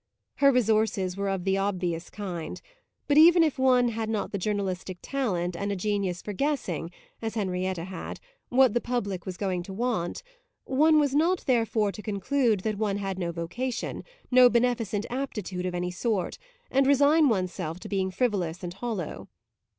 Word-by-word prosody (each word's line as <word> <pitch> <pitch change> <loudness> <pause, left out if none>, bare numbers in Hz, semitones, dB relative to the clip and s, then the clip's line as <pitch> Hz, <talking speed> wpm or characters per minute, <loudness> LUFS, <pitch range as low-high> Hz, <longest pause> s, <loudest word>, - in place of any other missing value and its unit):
Her 280 0 +6
resources 220 -6 +1
were 200 0 -2
of 190 -2 -2
the 195 +1 +1
obvious 180 -4 -2
kind; 180 -6 -5 0.5
but 290 +1 +5
even 335 +1 +8
if 305 -5 0
one 250 -2 +4
had 225 -1 -3
not 220 -2 -2
the 200 - -2
journalistic 190 -2 -2
talent 185 -11 -1
and 200 +4 -2
a - - -1
genius 195 -2 -1
for 210 - -5
guessing, 200 - -1 0.3
as 225 0 -3
Henrietta 185 -3 -2
said, 185 - -6 0.3
what 255 -2 +5
the 240 - +1
public 205 -7 -3
was 185 -1 -5
going 185 -3 -1
to 190 +2 -8
want, 220 - -2 0.4
one 305 +4 +4
was 285 -2 +1
not 340 +5 +2
therefore 225 -4 +2
to 210 - -9
conclude 215 +1 +1
that 215 0 -2
one 205 -2 0
had 195 -2 -3
no 170 -2 -1
vocation, 200 +10 -4 0.3
no 250 0 +8
beneficent 235 -4 +1
aptitude 210 -9 -3
of 180 - -3
any 180 0 -2
sort, 195 0 -2 0.3
and 270 0 +3
resign 285 +2 +5
one's 185 -5 0
self 165 -2 -5
to - - -7
being 190 -2 0
frivolous 185 -5 -1
and 175 -1 -4
hollow. 200 -5 -5
205 Hz, 175 wpm, -27 LUFS, 185-250 Hz, 0.5 s, even